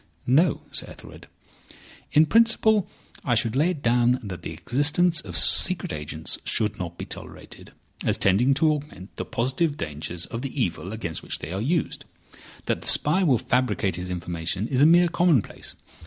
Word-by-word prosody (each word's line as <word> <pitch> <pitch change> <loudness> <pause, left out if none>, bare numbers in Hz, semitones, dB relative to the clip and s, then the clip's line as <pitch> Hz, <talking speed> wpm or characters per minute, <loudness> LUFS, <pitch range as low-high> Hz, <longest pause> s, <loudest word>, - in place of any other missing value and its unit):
"No, 150 +5 +3
Sir - - -3
Ethelred. - - -13 0.8
In 155 +1 +5
principle, 220 0 +3 0.4
I 120 - +1
should 115 +1 +1
lay 155 +6 +3
it 160 -6 -5
down 120 +1 +3
that 95 -4 -7
the - - -6
existence 155 +6 +2
of 90 -4 -6
secret - - +3
agents 75 +1 -4
should 105 -2 -1
not 85 -1 -6
be - - -6
tolerated, - - -10 0.3
as - - +1
tending 120 +8 +3
to 155 +2 +3
augment 145 -10 -7
the - - -4
positive 145 +6 -1
dangers 80 +3 -5
of 115 - -6
the 135 +1 -5
evil 90 -3 -2
against 85 -8 -5
which - - -5
they 75 - -8
are 95 +2 -3
used. 160 +7 -1 0.6
That - - -1
the - - -8
spy 160 +6 +4
will 145 -10 +3
fabricate 110 -7 0
his 90 +1 -5
information 90 +3 -3
is 130 -1 +1
a 150 - +7
mere 175 +2 +5
commonplace. 170 - 0
125 Hz, 170 wpm, -24 LUFS, 95-155 Hz, 0.8 s, a